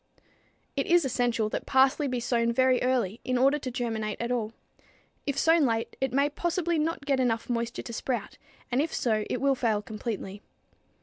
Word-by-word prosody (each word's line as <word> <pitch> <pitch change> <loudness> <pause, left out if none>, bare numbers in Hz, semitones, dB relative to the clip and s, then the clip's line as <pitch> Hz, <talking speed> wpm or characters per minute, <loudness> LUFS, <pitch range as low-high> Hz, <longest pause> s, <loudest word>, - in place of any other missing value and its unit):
It 275 - -1
is 345 -3 +4
essential 240 -3 +1
that - - -4
parsley 265 +2 +3
be 250 -2 -1
sown 235 -1 +1
very 255 +1 +3
early 245 -5 0
in 255 -1 0
order 275 +4 +3
to 265 - -4
germinate 225 -4 -3
at 235 +1 -2
all. 225 -3 -1 0.8
If 280 - -1
sown 325 -1 +4
late, 225 -1 -2
it 265 - 0
may 280 +3 +3
possibly 340 +2 -1
not 310 -2 -2
get 275 -2 +1
enough 240 -1 0
moisture 235 0 -2
to 235 - -7
sprout, 245 +2 -3 0.3
and 250 +3 +2
if 315 - -2
so 215 -3 0
it - - -1
will 275 0 +3
fail 230 -5 +1
completely. 210 -2 -5
250 Hz, 185 wpm, -28 LUFS, 230-275 Hz, 0.8 s, is